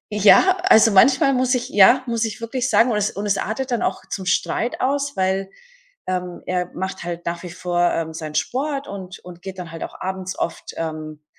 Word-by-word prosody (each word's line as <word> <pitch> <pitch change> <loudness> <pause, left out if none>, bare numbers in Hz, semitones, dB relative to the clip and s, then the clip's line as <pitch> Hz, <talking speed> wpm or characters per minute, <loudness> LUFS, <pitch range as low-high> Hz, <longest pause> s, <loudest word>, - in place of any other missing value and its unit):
Ja, 365 - +6
also, 225 - +6
manchmal 270 +8 +5
muss 255 0 +2
ich 250 +1 -3
ja, 245 +4 +6
muss 230 -1 -1
ich 220 -1 -3
wirklich 245 +2 -2
sagen 245 -1 +4
und 215 - +1
es 210 0 +1
und 200 +2 -5
es 200 -1 +1
artet 250 +5 -3
dann 240 - 0
auch - - -2
zum 190 -2 -5
Streit 235 +5 0
aus, 280 +1 -1
weil, 190 +1 0 0.6
ähm, 180 -1 -3
er 180 -1 -2
macht 190 -1 -4
halt 175 0 -6
nach 170 0 -3
wie 180 - -8
vor, 175 0 0
ähm, 160 -1 -3
seinen 155 -1 -7
Sport 275 - -2
und 190 -2 -8
und 175 -1 -13
geht 190 +1 -8
dann 175 -2 -7
halt 165 - -6
auch - - -8
abends 190 0 -4
oft, 165 - -4
ähm, 155 -2 -5
190 Hz, 210 wpm, -21 LUFS, 175-245 Hz, 0.6 s, Ja